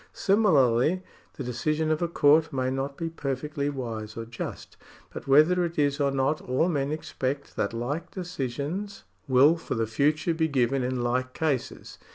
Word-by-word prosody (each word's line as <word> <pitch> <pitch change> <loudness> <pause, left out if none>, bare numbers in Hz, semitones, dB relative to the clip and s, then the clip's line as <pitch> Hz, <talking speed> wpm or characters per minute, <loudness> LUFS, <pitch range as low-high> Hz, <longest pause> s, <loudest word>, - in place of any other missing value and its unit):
Similarly 165 - +3 0.3
the 140 - -5
decision 155 +6 -1
of 155 - 0
a 170 - +1
court 155 -1 +4
may 130 -1 -1
not 135 +1 -3
be 165 - -3
perfectly 145 -1 -3
wise 115 -6 -5
or 115 - -4
just; 115 +1 -7 0.4
but - - -8
whether 155 +6 +5
it 170 -1 -3
is 145 -1 +1
or 140 -1 +2
not, 135 +3 0
all 130 +7 +1
men 140 -3 -1
expect 140 -2 -4
that 100 - -1
like 140 +9 -3
decisions 175 - -4 0.2
will 140 +5 +5
for - - -4
the 115 -1 0
future 150 +9 +1
be 160 0 +1
given 135 -2 +1
in 125 0 -1
like 130 +1 -1
cases. 145 -6 -3
140 Hz, 170 wpm, -27 LUFS, 130-160 Hz, 0.4 s, whether